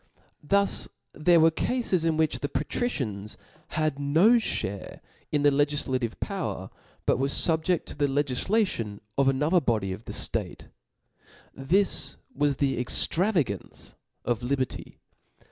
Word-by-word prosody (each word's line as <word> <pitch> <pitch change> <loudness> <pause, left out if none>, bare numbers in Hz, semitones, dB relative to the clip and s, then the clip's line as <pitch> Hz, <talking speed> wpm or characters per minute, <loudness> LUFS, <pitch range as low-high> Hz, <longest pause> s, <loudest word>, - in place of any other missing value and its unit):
Thus 200 +6 +1 0.3
there 170 +2 +4
were 165 +1 +5
cafes 195 -2 0
in 165 -1 +1
which 160 -1 +1
the 145 - -3
patricians 105 - -3 0.2
* 155 0 -29
had 155 -3 0
no 165 +12 +4
(hare 100 - -3 0.3
in 145 -1 +1
the 145 - +5
legif* 145 +1 +1
lative 125 -4 -1
poW^r, - - -4 0.3
but - - +2
f - - -6
were 135 - +1
fubjedt 160 +4 +1
to - - -7
the 145 - +1
Icgiflation 140 - 0 0.2
of 135 -1 +2
another 150 +7 +2
body 110 -7 0
of 105 +5 -10
the - - -6
ftate. - - -2 0.8
This 185 +9 +1 0.2
was 145 - +1
the 135 -2 0
ex<^ - - +6
travagance 165 - -1 0.3
of 120 -1 0
liberty. 130 0 -3
145 Hz, 145 wpm, -27 LUFS, 130-165 Hz, 0.8 s, ex<^